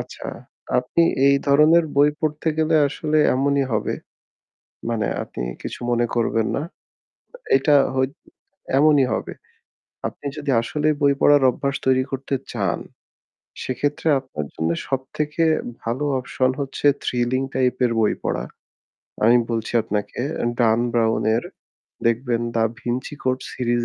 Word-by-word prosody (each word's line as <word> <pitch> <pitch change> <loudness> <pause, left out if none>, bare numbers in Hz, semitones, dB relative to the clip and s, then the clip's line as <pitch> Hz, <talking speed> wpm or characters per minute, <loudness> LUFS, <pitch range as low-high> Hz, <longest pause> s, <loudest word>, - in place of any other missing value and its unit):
আচ্ছা, - - -9 0.5
আপনি 125 +7 +1 0.3
এই 140 - +5
ধরনের 155 +4 +5
বই 145 +1 +6
পড়তে 155 +1 -1
গেলে 160 +1 +2
আসলে 155 +2 -1 0.2
এমনই 140 +1 +2
হবে। 110 - 0 1.0
মানে 110 -2 0 0.2
আপনি - - -8 0.2
কিছু - - -6
মনে 120 0 +2
করবেন 115 -1 +1
না। - - -1 1.0
এটা 145 +2 +3 0.2
হই 130 0 +2 0.7
এমনই 145 -3 +5
হবে। - - -4 0.8
আপনি 145 - -11
যদি 145 -2 -3
আসলেই 150 +6 0
বই 140 -1 +4
পড়ার 145 -1 +5
অভ্যাস 140 +2 -2
তৈরি 130 0 +3
করতে 135 +1 -3 0.2
চান, 100 -7 -1 0.8
সেক্ষেত্রে 145 +5 -1
আপনার 100 - -6
জন্য 80 +1 -1 0.2
সব 135 -1 0 0.2
থেকে 150 +2 -1 0.4
ভালো 120 +6 -2 0.2
option 130 +1 0
হচ্ছে 140 +1 -3 0.2
thrilling 125 +2 0
type 130 -1 +1
-এর 125 -2 +3
বই 110 - +3
পড়া। - - -2 0.8
আমি 120 +2 +6
বলছি 115 -1 -2
আপনাকে 105 -1 -4 0.4
Dan 115 -1 +4
Brown-এর 115 0 +1 0.6
দেখবেন 120 0 +1
'The 115 - +2
Da 115 - -8
Vinci 120 +3 -3
Code' 130 0 -1
series 120 -1 0
130 Hz, 135 wpm, -22 LUFS, 115-145 Hz, 1.0 s, বই